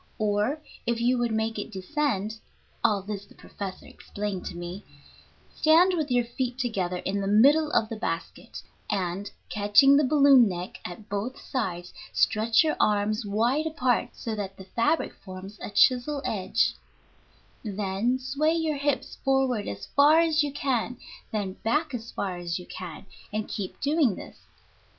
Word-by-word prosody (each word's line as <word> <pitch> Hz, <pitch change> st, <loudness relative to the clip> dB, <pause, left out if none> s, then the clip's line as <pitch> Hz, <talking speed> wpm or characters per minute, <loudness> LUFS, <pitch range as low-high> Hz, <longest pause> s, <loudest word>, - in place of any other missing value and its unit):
Or 215 Hz, +7 st, 0 dB, 0.3 s
if 235 Hz, -1 st, +1 dB
you 245 Hz, +1 st, +2 dB
would 240 Hz, -1 st, 0 dB
make 220 Hz, 0 st, -1 dB
it 205 Hz, -, -5 dB
descend 220 Hz, 0 st, -2 dB, 0.4 s
(all 210 Hz, -4 st, +2 dB
this 200 Hz, 0 st, -5 dB
the -, -, -19 dB
professor 195 Hz, -2 st, -8 dB
explained 205 Hz, -2 st, -5 dB
to 175 Hz, -, -6 dB
me), 175 Hz, +3 st, -6 dB, 0.7 s
stand 335 Hz, +4 st, +5 dB
with 310 Hz, -5 st, -1 dB
your 245 Hz, -1 st, +2 dB
feet 245 Hz, +1 st, -3 dB
together 195 Hz, -8 st, -1 dB
in 195 Hz, +2 st, -2 dB
the 195 Hz, -, -2 dB
middle 280 Hz, +10 st, +5 dB
of 220 Hz, -, +2 dB
the 225 Hz, -, -5 dB
basket, 165 Hz, -4 st, -5 dB, 0.3 s
and, 195 Hz, 0 st, -2 dB, 0.2 s
catching 210 Hz, +7 st, +5 dB
the 295 Hz, -, +5 dB
balloon 275 Hz, -4 st, +6 dB
neck 180 Hz, 0 st, -6 dB
at 180 Hz, +4 st, -8 dB
both 210 Hz, +6 st, -3 dB
sides, 180 Hz, -8 st, -4 dB, 0.2 s
stretch 220 Hz, +4 st, +3 dB
your 310 Hz, -, 0 dB
arms 210 Hz, +1 st, +1 dB
wide 240 Hz, +10 st, +1 dB
apart 255 Hz, -6 st, +1 dB
so 225 Hz, -, -4 dB
that 200 Hz, -2 st, -5 dB
the 190 Hz, -, -10 dB
fabric 230 Hz, +11 st, 0 dB
forms 190 Hz, +2 st, -10 dB
a -, -, -5 dB
chisel 255 Hz, +6 st, +3 dB
edge, 230 Hz, +2 st, +1 dB, 0.9 s
then 205 Hz, +3 st, -1 dB
sway 285 Hz, +5 st, 0 dB
your 320 Hz, -3 st, 0 dB
hips 285 Hz, -1 st, -2 dB
forward 265 Hz, -5 st, +1 dB
as 100 Hz, 0 st, -5 dB
far 295 Hz, +3 st, +5 dB
as 320 Hz, -2 st, +3 dB
you 290 Hz, -1 st, -1 dB
can, 250 Hz, -3 st, -1 dB, 0.3 s
then 205 Hz, -3 st, -2 dB
back 300 Hz, +6 st, 0 dB
as 230 Hz, -1 st, -5 dB
far 185 Hz, -3 st, -3 dB
as 175 Hz, -1 st, -3 dB
you 180 Hz, -, -8 dB
can, 180 Hz, -1 st, -8 dB, 0.3 s
and 215 Hz, +1 st, -2 dB
keep 195 Hz, -3 st, -5 dB
doing 285 Hz, -, +2 dB
this. -, -, -12 dB
225 Hz, 160 wpm, -27 LUFS, 200-270 Hz, 0.9 s, balloon